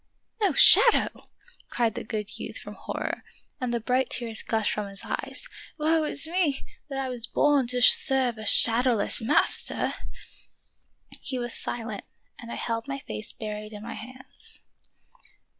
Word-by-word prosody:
"No 395 Hz, -6 st, +2 dB
shadow!" 470 Hz, -, +6 dB, 0.6 s
cried 230 Hz, -2 st, 0 dB
the -, -, -6 dB
good 215 Hz, -1 st, -5 dB
youth -, -, -7 dB
with -, -, -8 dB
hor -, -, -7 dB
ror, -, -, -3 dB, 0.4 s
and 250 Hz, -2 st, -2 dB
the 235 Hz, -, -1 dB
bright 250 Hz, +3 st, 0 dB
tears 230 Hz, -3 st, -2 dB
gushed 220 Hz, -2 st, -1 dB
from 210 Hz, -1 st, -3 dB
his 195 Hz, 0 st, -7 dB
eyes. -, -, -3 dB, 0.3 s
"Woe 315 Hz, 0 st, +1 dB
is 300 Hz, -, +4 dB
me, 325 Hz, -4 st, -1 dB, 0.2 s
that 270 Hz, -1 st, -4 dB
I 265 Hz, -, -2 dB
was 245 Hz, -2 st, -1 dB
born 285 Hz, -2 st, +2 dB
to 250 Hz, 0 st, +2 dB
serve 255 Hz, -3 st, +4 dB
a 215 Hz, -, -5 dB
shadow 240 Hz, +2 st, +5 dB
less 215 Hz, +2 st, 0 dB
master! 225 Hz, -, +1 dB, 0.6 s
" -, -, -22 dB
He 260 Hz, -, -2 dB
was 240 Hz, -1 st, -3 dB
silent, 225 Hz, -4 st, -2 dB, 0.3 s
and 235 Hz, -1 st, -9 dB
I -, -, -4 dB
held 230 Hz, +1 st, -3 dB
my 275 Hz, 0 st, -3 dB
face 215 Hz, -5 st, -7 dB
buried 215 Hz, 0 st, -7 dB
in 210 Hz, 0 st, -9 dB
my 230 Hz, -, -6 dB
hands. 255 Hz, +3 st, -12 dB
240 Hz, 165 wpm, -26 LUFS, 220-270 Hz, 0.6 s, shadow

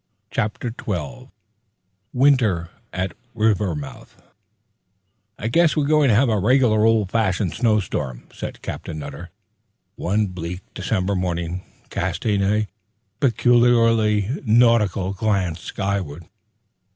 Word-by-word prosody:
Chapter 110 Hz, +3 st, -2 dB
Twelve 85 Hz, -, -5 dB, 0.8 s
Winter 120 Hz, -11 st, +2 dB, 0.2 s
at 90 Hz, 0 st, -3 dB, 0.2 s
Rivermouth 100 Hz, -10 st, -1 dB, 1.2 s
"I 110 Hz, -, -3 dB
guess 165 Hz, +7 st, +3 dB
we're 150 Hz, -, +2 dB
going 150 Hz, -2 st, +4 dB
to 110 Hz, -, +4 dB
have 130 Hz, +5 st, +4 dB
a 110 Hz, -3 st, +1 dB
regular 110 Hz, 0 st, +3 dB
old 110 Hz, -4 st, +2 dB
fashioned 100 Hz, -5 st, 0 dB
snowstorm," 95 Hz, -, -1 dB
said -, -, -7 dB
Captain 80 Hz, -, -6 dB
Nutter, 75 Hz, -, -8 dB, 0.7 s
one 105 Hz, +4 st, +1 dB
bleak 90 Hz, -1 st, -6 dB
December 95 Hz, 0 st, -1 dB
morning, 90 Hz, -1 st, -2 dB, 0.3 s
casting 105 Hz, -3 st, -1 dB
a 105 Hz, +2 st, +1 dB, 0.5 s
peculiarly 115 Hz, -2 st, +3 dB
nautical 110 Hz, -5 st, +3 dB
glance 95 Hz, -5 st, 0 dB
skyward. 95 Hz, -6 st, -3 dB
105 Hz, 105 wpm, -22 LUFS, 90-115 Hz, 1.2 s, going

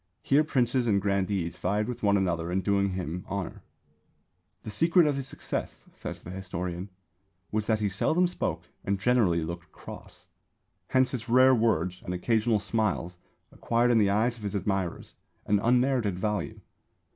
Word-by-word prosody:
Here 145 Hz, +3 st, +4 dB
princes 125 Hz, -4 st, +1 dB
and 100 Hz, -3 st, +3 dB
grandees 100 Hz, -3 st, -1 dB
vied 105 Hz, +4 st, 0 dB
with 125 Hz, -, -5 dB
one 100 Hz, -1 st, +3 dB
another 85 Hz, -3 st, -1 dB
in 95 Hz, +2 st, +1 dB
doing 100 Hz, -1 st, +1 dB
him 90 Hz, -1 st, -4 dB
honour. 100 Hz, -2 st, -4 dB, 1.0 s
"The 110 Hz, -, -6 dB
secret 165 Hz, -, +4 dB
of 145 Hz, -2 st, +2 dB
his 135 Hz, -1 st, -4 dB
success," -, -, -5 dB
says -, -, -7 dB
the 90 Hz, -, -8 dB
historian, 90 Hz, 0 st, -5 dB, 0.6 s
"was 105 Hz, 0 st, -1 dB
that 110 Hz, -1 st, +1 dB
he 105 Hz, -, +2 dB
seldom 155 Hz, -, +2 dB
spoke 180 Hz, -, -2 dB, 0.2 s
and 100 Hz, 0 st, -1 dB
generally 100 Hz, -7 st, +3 dB
looked 85 Hz, 0 st, -7 dB
cross. -, -, -11 dB, 0.6 s
Hence 130 Hz, 0 st, +3 dB
his 125 Hz, -2 st, -4 dB
rare 130 Hz, +2 st, +6 dB
words 95 Hz, -7 st, +1 dB
and 90 Hz, -, -3 dB
occasional 110 Hz, +3 st, +1 dB
smiles 95 Hz, -4 st, -1 dB, 0.3 s
acquired 120 Hz, +1 st, +1 dB
in 115 Hz, -, +4 dB
the 100 Hz, -2 st, +4 dB
eyes 115 Hz, +4 st, +1 dB
of -, -, -12 dB
his 105 Hz, 0 st, -3 dB
admirers 95 Hz, -2 st, -2 dB, 0.3 s
an 105 Hz, 0 st, +2 dB
unmerited 125 Hz, -3 st, +2 dB
value." 105 Hz, +2 st, -2 dB
105 Hz, 160 wpm, -28 LUFS, 95-120 Hz, 1.0 s, rare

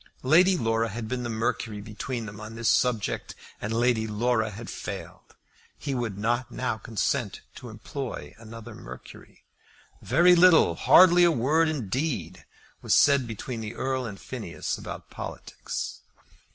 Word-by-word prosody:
Lady 180 Hz, +7 st, +5 dB
Laura 115 Hz, -3 st, 0 dB
had 110 Hz, +1 st, -5 dB
been 125 Hz, +2 st, -3 dB
the 120 Hz, -, -4 dB
Mercury 110 Hz, -1 st, -2 dB
between 110 Hz, +3 st, -5 dB
them 105 Hz, 0 st, -9 dB
on 110 Hz, +1 st, -8 dB
this 115 Hz, 0 st, -2 dB
subject, 120 Hz, -4 st, +1 dB, 0.3 s
and 105 Hz, -, -3 dB
Lady 115 Hz, -1 st, +1 dB
Laura 110 Hz, +1 st, 0 dB
had 110 Hz, +2 st, -9 dB
failed. -, -, -8 dB, 0.4 s
He 140 Hz, -, -4 dB
would 120 Hz, -6 st, -3 dB
not 120 Hz, +3 st, 0 dB
now 120 Hz, -2 st, -2 dB
consent 110 Hz, -1 st, -2 dB, 0.2 s
to 125 Hz, -, -9 dB
employ 120 Hz, +4 st, -6 dB
another 115 Hz, 0 st, -10 dB
Mercury. 65 Hz, +1 st, -12 dB, 0.6 s
Very 180 Hz, +2 st, +5 dB
little, 175 Hz, -1 st, +6 dB
hardly 175 Hz, -1 st, +6 dB
a 175 Hz, -, +6 dB
word 155 Hz, +4 st, +2 dB
indeed, 130 Hz, -, -3 dB, 0.4 s
was -, -, +2 dB
said 140 Hz, -4 st, +4 dB
between 115 Hz, +1 st, -5 dB
the 110 Hz, +1 st, -6 dB
Earl 130 Hz, -1 st, -2 dB
and 100 Hz, -3 st, -8 dB
Phineas 110 Hz, -10 st, -5 dB
about -, -, -8 dB
politics. -, -, -6 dB
120 Hz, 145 wpm, -26 LUFS, 110-130 Hz, 0.6 s, little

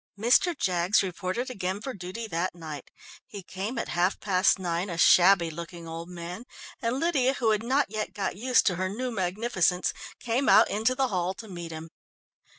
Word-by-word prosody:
Mr. 250 Hz, -, +3 dB
Jaggs 180 Hz, 0 st, +2 dB
reported 190 Hz, +7 st, -3 dB
again 190 Hz, -3 st, -3 dB
for 260 Hz, +5 st, -6 dB
duty 190 Hz, +4 st, -6 dB
that 180 Hz, -3 st, -2 dB
night. 155 Hz, -5 st, -8 dB, 0.4 s
He 205 Hz, -6 st, -9 dB
came 195 Hz, +7 st, -5 dB
at -, -, -3 dB
half 175 Hz, +2 st, +1 dB
past 190 Hz, -2 st, +3 dB
nine, 175 Hz, +1 st, -2 dB
a 170 Hz, -, -4 dB
shabby 175 Hz, 0 st, +5 dB
looking 170 Hz, +1 st, -8 dB
old 165 Hz, +1 st, -7 dB
man, 180 Hz, +5 st, -7 dB, 0.4 s
and 240 Hz, +2 st, -1 dB
Lydia, 275 Hz, -6 st, +2 dB
who 230 Hz, -5 st, +1 dB
had 215 Hz, -1 st, +1 dB
not 260 Hz, +5 st, +2 dB
yet 215 Hz, -1 st, -3 dB
got 200 Hz, -, -3 dB
used 250 Hz, +5 st, +2 dB
to 180 Hz, -4 st, +1 dB
her 185 Hz, +1 st, -1 dB
new 250 Hz, +5 st, -3 dB
magnificence, 185 Hz, -2 st, 0 dB, 0.3 s
came 245 Hz, +3 st, 0 dB
out -, -, +6 dB
into 220 Hz, +5 st, +1 dB
the 265 Hz, -1 st, +1 dB
hall 185 Hz, -1 st, -1 dB
to 225 Hz, -, -10 dB
meet 175 Hz, -4 st, -7 dB
him. 160 Hz, 0 st, -8 dB
190 Hz, 185 wpm, -27 LUFS, 175-230 Hz, 0.4 s, out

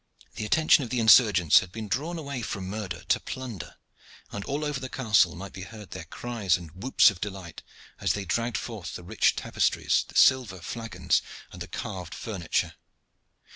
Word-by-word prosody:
The 105 Hz, -, -4 dB
attention 155 Hz, +4 st, +4 dB
of 120 Hz, -, -6 dB
the 125 Hz, -, -1 dB
insurgents 105 Hz, -, +6 dB
had 90 Hz, -, -7 dB
been 110 Hz, +1 st, -6 dB
drawn 150 Hz, -, -2 dB
away 140 Hz, -5 st, -5 dB
from 100 Hz, -4 st, -4 dB
murder 95 Hz, -4 st, -5 dB
to -, -, +3 dB
plunder, 125 Hz, -8 st, -7 dB, 0.6 s
and 100 Hz, -, -5 dB
all 145 Hz, +2 st, -2 dB
over 150 Hz, -2 st, -2 dB
the 130 Hz, -1 st, -6 dB
castle 105 Hz, -, +3 dB
might 95 Hz, +2 st, -8 dB
be 95 Hz, -, -8 dB
heard 105 Hz, 0 st, -10 dB
their 80 Hz, -, -7 dB
cries 105 Hz, -1 st, -1 dB
and 85 Hz, -3 st, -11 dB
whoops 100 Hz, +9 st, +4 dB
of 90 Hz, -, -12 dB
delight 95 Hz, -5 st, -6 dB, 0.4 s
as -, -, +1 dB
they 100 Hz, -1 st, -4 dB
dragged 115 Hz, +6 st, -1 dB
forth 110 Hz, -7 st, -6 dB
the 90 Hz, -, -8 dB
rich 105 Hz, +5 st, +2 dB
tapestries, -, -, +1 dB
the -, -, -15 dB
silver 125 Hz, -8 st, +4 dB
flagons, 115 Hz, +6 st, -1 dB, 0.3 s
and -, -, -11 dB
the -, -, -5 dB
carved 90 Hz, -5 st, -6 dB
furniture. 95 Hz, -7 st, -2 dB
105 Hz, 180 wpm, -27 LUFS, 95-120 Hz, 0.6 s, insurgents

